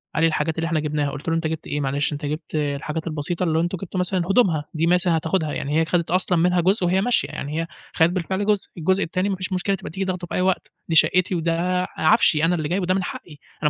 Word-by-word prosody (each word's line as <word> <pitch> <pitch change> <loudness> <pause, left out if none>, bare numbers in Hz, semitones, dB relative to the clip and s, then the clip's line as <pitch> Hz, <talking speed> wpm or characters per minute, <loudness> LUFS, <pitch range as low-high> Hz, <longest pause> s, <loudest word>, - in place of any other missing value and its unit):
قال 165 - +1
لي: - - +6
"الحاجات 160 0 -1
اللي 165 0 -1
إحنا 165 -2 0
جِبناها" 150 -2 -1
قلت 145 +4 -5
له: 165 - +1
"أنت 165 -1 0
جِبت 160 0 -5
إيه 145 0 -2
معلش؟" 140 +2 -1
أنت 145 0 -5
جِبت 155 +2 -5
الحاجات 150 +2 -2
البسيطة 160 +3 -2
اللي 160 -2 +1
هو - - +3
أنتم 175 +1 -2
جِبتوا 185 +1 -5
مثلًا 180 +1 +1
هدومها 185 -9 +2
دي 165 +2 +1
مثلًا 180 -1 +3
هتاخدها، 160 -1 -1
يعني 150 +3 -1
هي - - +1
خدت 170 -1 -1
أصلًا 180 -1 +2
منها 180 +1 +3
جُزء 190 +1 +3
وهي 190 +2 +2
ماشية، 245 +2 +1
يعني 150 +3 -4
هي 165 - -4 0.3
خدِت 160 +1 +4
بالفعل 190 +2 -2
جُزء، 210 -2 +1
الجزء 190 +4 +1
التاني 185 +4 -1
ما 195 - 0
فيش 185 +1 -4
مشكلة 195 +2 0
تبقى - - -8
تيجي 190 +3 -3
تاخدُه 180 -2 -3
في - - -5
أي - - +1
وقت، 185 0 0 0.2
دي 165 - 0
شقِّتي 185 +3 +4
وده 175 +2 0
عفشي، 155 0 +4
أنا 175 +1 +2
اللي 155 -2 -3
جايبُه 185 +1 0
وده 185 +1 +1
من 190 - 0
حقّي 155 -4 -8 0.3
أنا 150 - +4
165 Hz, 265 wpm, -22 LUFS, 155-185 Hz, 0.3 s, لي